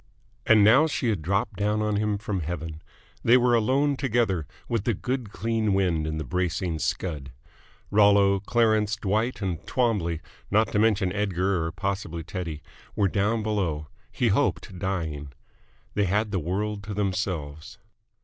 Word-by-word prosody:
And 110 -2 +6
now 130 +10 +6
she 135 -5 -1
had 105 -7 -1
dropped 95 +3 -1
down 105 +1 +1
on 105 -1 0
him 105 -1 0
from 105 -1 -3
heaven. 80 -1 -5 0.4
They 120 +2 +6
were 125 -1 +3
alone 135 +6 +2
together 110 - 0 0.2
with 115 -4 -1
the 115 - +1
good 125 0 -3
clean 110 -3 0
wind 85 -5 +1
and 80 0 -3
the - - -2
bracing 90 +3 -1
scud. 75 -2 -3 0.6
Rollo, 100 -1 +5
Clarence, 110 0 +2
Dwight, 110 +2 -1
and 90 -4 -3
Twombley, 105 -10 0 0.3
not 110 +2 +2
to 105 - +1
mention 105 -4 +2
Edgar 95 -3 0
or 80 - -3
possibly 95 -5 -3
Teddy, 80 -3 -5 0.3
were 100 -2 +2
down 105 +4 0
below 85 -9 -1 0.2
he - - +1
hoped, 90 - 0
dying. 80 -7 -3 0.6
They 105 - +1
had 105 +3 0
the 95 - 0
world 100 +5 -2
to 105 -1 -5
themselves. 90 -7 -3
100 Hz, 155 wpm, -26 LUFS, 85-110 Hz, 0.6 s, And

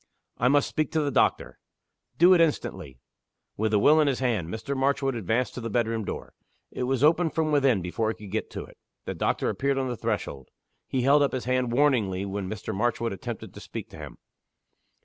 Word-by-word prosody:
"I 120 - +3
must 145 +2 +3
speak 155 - -2
to 160 - +2
the 145 -1 -1
doctor." - - +1 0.6
"Do 175 +3 +7
it 175 - +5
instantly!" 95 - -1 0.6
With 110 +1 0
the 105 - +3
will 150 +9 +5
in 150 - +2
his 135 -3 +1
hand, 115 -10 -1
Mr. 110 +7 -4
Marchwood 135 0 +1
advanced 115 +3 -1
to 125 - -6
the 115 - -4
bedroom 115 -1 0
door. - - -6 0.4
It 125 - -3
was 130 +1 0
opened 165 +2 +3
from 160 -1 +1
within 135 - +3
before 110 +5 -1
he 110 - -2
could 105 -3 -11
get 110 - -2
to - - -6
it. - - -19 0.3
The - - -3
doctor - - -1
appeared 140 0 -1
on 130 -1 -1
the 120 - -2
threshold. 95 - -4 0.4
He 130 -2 -1
held 140 +3 +5
up 140 - +2
his 130 - -3
hand 130 -1 0
warningly 115 -8 +2
when 100 -1 -4
Mr. 110 - -5
Marchwood 115 +1 -1
attempted 95 - -7
to - - -10
speak - - -8
to - - -11
him. - - -9
125 Hz, 210 wpm, -26 LUFS, 105-140 Hz, 0.6 s, Do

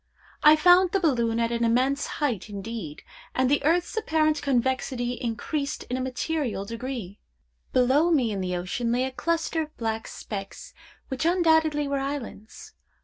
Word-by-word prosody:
I 305 0 +8
found 355 +3 +5
the 390 - +3
balloon 235 -9 +1
at 230 0 +1
an 235 0 0
immense 255 +5 +2
height 235 -9 -1
indeed, 200 -6 -6 0.3
and 260 0 +2
the 290 - +2
earth's 340 +6 +1
apparent 310 -7 +1
convexity 260 -2 0
increased 250 +5 -3
in - - 0
a 260 - -2
material 260 -4 -2
degree. 230 -3 -6 0.5
Below 265 +6 +3
me 265 -9 +2
in 195 -2 -3
the 180 -1 -2
ocean 190 +7 -2
lay 245 +2 +1
a 265 - -2
cluster 330 +3 -1
of 310 -1 -8
black 225 -1 -3
specks, 195 -2 -7 0.4
which 265 +2 -3
undoubtedly 320 -4 +3
were 280 0 -1
islands. 270 -6 -6
260 Hz, 155 wpm, -26 LUFS, 230-310 Hz, 0.5 s, I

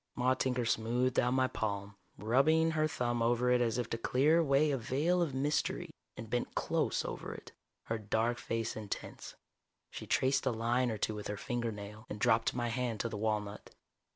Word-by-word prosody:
Maude 130 +1 +1
Tinker 125 -2 0
smoothed 120 +3 +1
out 125 +1 +2
my 130 0 +3
palm, 100 -4 -3 0.2
rubbing 155 +9 +3
her 155 -1 +1
thumb 120 -5 -1
over 120 +1 +2
it 125 0 +4
as 115 -1 +1
if 120 -2 -1
to 115 - -2
clear 145 +8 +3
away 150 -1 +3
a 135 - +1
veil 150 +10 +1
of 150 -6 -1
mystery, 145 +3 -1 0.3
and 110 - -7
bent 120 +2 -2
close - - 0
over - - -5
it, - - -11 0.3
her 115 0 -3
dark 110 +3 0
face 115 -1 -2
intense. 105 -2 -6 0.6
She - - -7
traced 135 +1 +2
a - - +3
line 120 +2 +1
or 110 - -2
two 110 - -1
with 105 -1 -6
her 105 - -4
fingernail, 110 -2 -4
and 105 - -5
dropped 110 +3 +2
my 120 -1 -1
hand 120 -2 -2
to 115 - -2
the 110 - -5
walnut. 105 -1 -3
120 Hz, 190 wpm, -33 LUFS, 110-130 Hz, 0.6 s, it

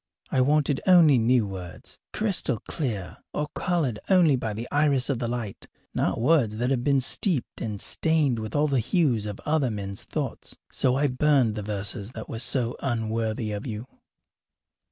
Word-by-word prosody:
I 130 - +3
wanted 145 0 +2
only 165 -8 +7
new 115 0 +3
words, 95 -3 -9
crystal 195 - 0
clear 110 - -4 0.2
or 150 0 -1
coloured 155 -11 -1
only 175 -7 +5
by 115 -4 -3
the 115 +3 -5
iris 145 -2 +2
of 130 - -2
the 120 - -2
light, 115 -4 -5 0.3
not - - 0
words 125 -4 +3
that 125 +3 0
have 125 -3 0
been 140 -1 +3
steeped 155 - -1
and 105 -3 -3
stained 150 -5 +1
with 110 +4 -5
all 145 +1 +3
the 135 -3 +1
hues 125 - +1
of 105 -1 -6
other 150 -4 +2
men's 100 -2 -5
thoughts. - - -5
So 125 -1 +1
I 140 +2 +2
burned 135 -3 +3
the 105 - -4
verses 105 +2 -4
that 110 - -7
were 115 - -5
so 120 -1 0
unworthy 115 -2 -1
of 105 +4 -5
you. 110 0 -5
125 Hz, 175 wpm, -26 LUFS, 110-145 Hz, 0.3 s, only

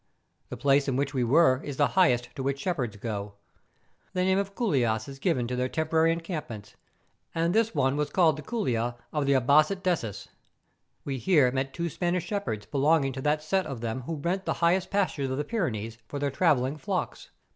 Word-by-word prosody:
The - - -6
place 140 0 +3
in 135 - 0
which 140 +2 -1
we 130 -3 +1
were 130 +1 +4
is 145 -2 -6
the 145 - +3
highest 125 -10 +3
to - - -5
which 140 +1 -1
shepherds 125 - -2
go. 100 -2 -5 0.8
The 180 - +1
name 190 +1 +3
of 200 0 -4
couilas 120 - 0
is 135 -1 -9
given 135 -7 0
to 125 - -3
their 125 +1 -1
temporary 160 +2 +2
encampments; 155 - -5 0.6
and 165 +1 +1
this 225 +1 +2
one 135 +1 +2
was 150 0 0
called 165 -5 +3
the 155 - -7
couila 120 - -1 0.2
of 150 -2 0
the 140 - +4
Abassat 150 +9 +3
dessus. 115 - -2 0.8
We 135 -2 -3
here 150 -6 +4
met 135 +1 -2
two 170 +3 -3
Spanish 175 +1 -1
shepherds 200 - -3
belonging 140 +1 +2
to 130 - -5
that 150 +2 +1
set 190 +2 0
of 135 -6 -6
them 115 +2 -3
who 160 +6 -4
rent 175 +6 -2
the - - 0
highest 175 +2 +1
pastures 185 -9 0
of 130 - -2
the 145 - -1
Pyrenees 115 - -3
for 145 - -5
their 140 0 -1
travelling 140 -3 +2
flocks. 140 - -4
145 Hz, 200 wpm, -27 LUFS, 125-170 Hz, 0.8 s, were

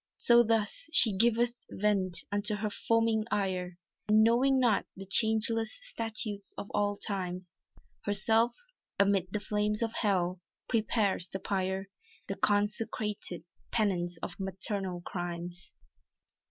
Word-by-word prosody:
So 235 0 +5
thus, 225 +4 0
she 225 - +7
giveth 235 +3 +3 0.2
vent 190 -4 0
unto 205 +1 0
her 210 0 -3
foaming 225 0 +1
ire, 185 -3 -2 0.3
And 215 +1 +5
knowing 260 +4 +3
not 240 -5 +2
the 195 - -6
changeless 220 +2 +4
statutes 225 - -2
of 205 - -7
all 205 0 0
times, 185 -3 -5 0.5
Herself, 220 +3 +2 0.4
amid 200 -2 +3
the 210 - -1
flames 210 +1 -1
of 225 0 -2
hell, 185 -4 0 0.3
prepares 215 -5 0
the - - -4
pyre; 190 0 -2 0.4
The 195 - -3
consecrated 210 -3 -1 0.3
penance 180 -6 0
of 175 - -6
maternal 190 -1 -3
crimes. 175 0 -6
205 Hz, 120 wpm, -30 LUFS, 190-225 Hz, 0.5 s, she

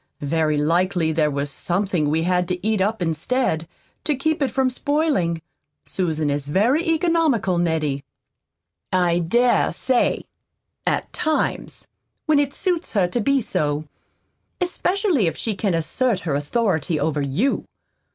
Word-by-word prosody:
Very 155 0 +1
likely 170 +2 +1
there 155 -1 +2
was 140 0 -2
something 175 -2 0
we 160 +2 +1
had 180 0 +1
to 180 +3 -2
eat 215 -3 +1
up 205 0 0
instead, 165 - 0 0.4
to 300 - 0
keep 315 +4 -1
it 275 - +2
from 260 +1 +1
spoiling. 255 - 0 0.4
Susan 160 -5 -1
is 140 0 -2
very 230 - +2
economical, 320 - +2
Nettie." 155 -5 0 0.9
"I 175 -2 +2
dare 240 +9 +3
say 255 -2 0 0.6
at - - 0
times, 310 0 -1 0.4
when 310 -2 +4
it 285 -1 +1
suits 360 -3 -1
her 195 -5 +3
to 240 +6 -1
be 275 +4 +2
so, 150 -8 -1 0.8
especially 360 - +1
if 160 - -2
she 225 - -1
can 195 -3 0
assert 200 +6 0
her 160 - -2
authority 160 0 0
over 155 -2 0
you. 145 - 0
185 Hz, 140 wpm, -22 LUFS, 160-260 Hz, 0.9 s, when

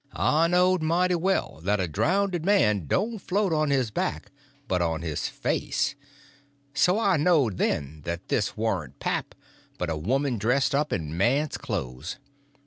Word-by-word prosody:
I 160 +2 +3
knowed 180 +1 +3
mighty 175 +3 +2
well 180 - 0
that 100 +4 +1
a 90 - 0
drownded 175 - 0
man 105 - +3
don't 220 - 0
float 190 -1 0
on 155 -1 +1
his 130 -5 +1
back, 80 -5 -3 0.4
but 90 -4 0
on 80 -1 -1
his 80 -4 -2
face. - - -1 0.8
So 180 +3 +3
I 195 -6 +3
knowed, 145 - +2
then, 75 0 -1
that 85 0 -4
this - - -1
warn't - - -2
pap, - - -3 0.4
but 90 -2 -2
a - - -1
woman 130 - 0
dressed 125 +7 +2
up 150 +2 +1
in 80 -5 -2
a - - -5
man's 130 - +1
clothes. 65 +7 -4
135 Hz, 160 wpm, -26 LUFS, -, 0.8 s, I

